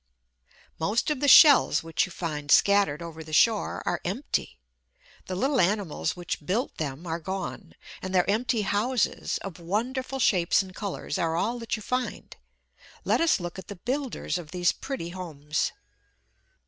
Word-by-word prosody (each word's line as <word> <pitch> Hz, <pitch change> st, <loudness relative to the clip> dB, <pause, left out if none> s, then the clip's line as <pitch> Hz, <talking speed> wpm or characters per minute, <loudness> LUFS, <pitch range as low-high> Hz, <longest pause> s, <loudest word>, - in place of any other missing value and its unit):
Most 210 Hz, -, 0 dB
of 295 Hz, -, -1 dB
the 285 Hz, -, +1 dB
shells 285 Hz, -, +7 dB
which 165 Hz, +3 st, 0 dB
you -, -, -13 dB
find 150 Hz, -4 st, -5 dB
scattered 195 Hz, -4 st, +4 dB
over 160 Hz, -1 st, -8 dB
the 155 Hz, -, -12 dB
shore 215 Hz, +7 st, +2 dB
are -, -, -1 dB
empty. -, -, -3 dB, 0.7 s
The 185 Hz, -, -3 dB
little 265 Hz, +6 st, +2 dB
animals 190 Hz, -3 st, 0 dB
which 175 Hz, -3 st, -5 dB
built 215 Hz, -, -1 dB
them 150 Hz, +1 st, -4 dB
are 165 Hz, 0 st, -3 dB
gone; 190 Hz, +1 st, -6 dB, 0.3 s
and 185 Hz, -, -5 dB
their 180 Hz, 0 st, +3 dB
empty 220 Hz, +1 st, +1 dB
houses, 210 Hz, +4 st, 0 dB
of 190 Hz, -3 st, -7 dB
wonderful 250 Hz, +10 st, -2 dB
shapes 185 Hz, -6 st, +3 dB
and 185 Hz, -1 st, -12 dB
colours, 200 Hz, 0 st, -4 dB
are 165 Hz, -1 st, 0 dB
all 225 Hz, +8 st, -1 dB
that 230 Hz, -1 st, -2 dB
you 215 Hz, -, -8 dB
find. 250 Hz, +2 st, -3 dB, 0.7 s
Let -, -, +2 dB
us 330 Hz, -9 st, +3 dB
look 175 Hz, +1 st, -6 dB
at -, -, -11 dB
the 200 Hz, -, -7 dB
builders 250 Hz, -2 st, -3 dB
of 160 Hz, -3 st, -10 dB
these 175 Hz, 0 st, +2 dB
pretty 265 Hz, -12 st, -5 dB
homes. 150 Hz, -5 st, -3 dB
190 Hz, 160 wpm, -27 LUFS, 170-230 Hz, 0.7 s, shells